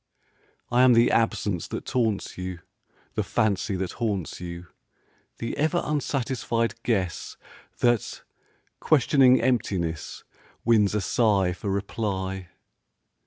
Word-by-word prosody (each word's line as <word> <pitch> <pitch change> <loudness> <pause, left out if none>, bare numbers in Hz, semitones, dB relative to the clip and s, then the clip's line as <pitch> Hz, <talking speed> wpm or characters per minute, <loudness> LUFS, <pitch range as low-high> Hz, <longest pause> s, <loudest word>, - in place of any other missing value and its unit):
I 120 +1 +4
am 130 -1 +7
the 115 0 +5
absence 105 -6 0
that - - -6
taunts 115 -6 -1
you, 90 -2 -6 0.5
The - - 0
fancy 100 -2 0
that 95 -1 -3
haunts 100 -7 -2
you; 85 0 -7 0.7
The 115 - -4
ever 160 +4 +1
unsatisfied 125 -6 -1
guess 95 -8 -2 0.4
That, 120 -3 +1 0.6
questioning 130 -3 +5
emptiness, 95 - -1 0.4
Wins 105 -3 +4
a 105 - +1
sigh 100 -3 +2
for 100 +3 -5
reply. 95 -2 -3
105 Hz, 110 wpm, -26 LUFS, 95-120 Hz, 0.7 s, am